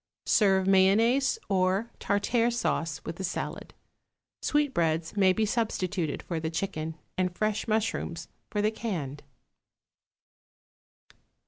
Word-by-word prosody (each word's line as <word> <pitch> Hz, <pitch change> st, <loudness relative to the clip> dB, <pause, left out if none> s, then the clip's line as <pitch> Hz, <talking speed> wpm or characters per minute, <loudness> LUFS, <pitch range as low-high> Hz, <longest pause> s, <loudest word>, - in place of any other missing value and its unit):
Serve 190 Hz, -3 st, +4 dB
mayonnaise 220 Hz, -, +4 dB
or 190 Hz, +3 st, +1 dB
tartare 230 Hz, +4 st, +1 dB
sauce 165 Hz, -, -1 dB
with 165 Hz, -, -5 dB
the 190 Hz, -, -5 dB
salad. 180 Hz, -, -4 dB, 0.7 s
Sweetbreads 170 Hz, -, +1 dB
may 190 Hz, -2 st, +5 dB
be 215 Hz, +4 st, +1 dB
substituted 190 Hz, -8 st, -1 dB
for 170 Hz, -2 st, -3 dB
the 160 Hz, 0 st, -2 dB
chicken, 160 Hz, -2 st, -3 dB, 0.2 s
and 180 Hz, -1 st, 0 dB
fresh 215 Hz, +1 st, 0 dB
mushrooms 215 Hz, -6 st, -1 dB, 0.2 s
for 205 Hz, -, -1 dB
the 215 Hz, -, +3 dB
canned. 165 Hz, -, -4 dB
195 Hz, 110 wpm, -28 LUFS, 170-220 Hz, 0.7 s, may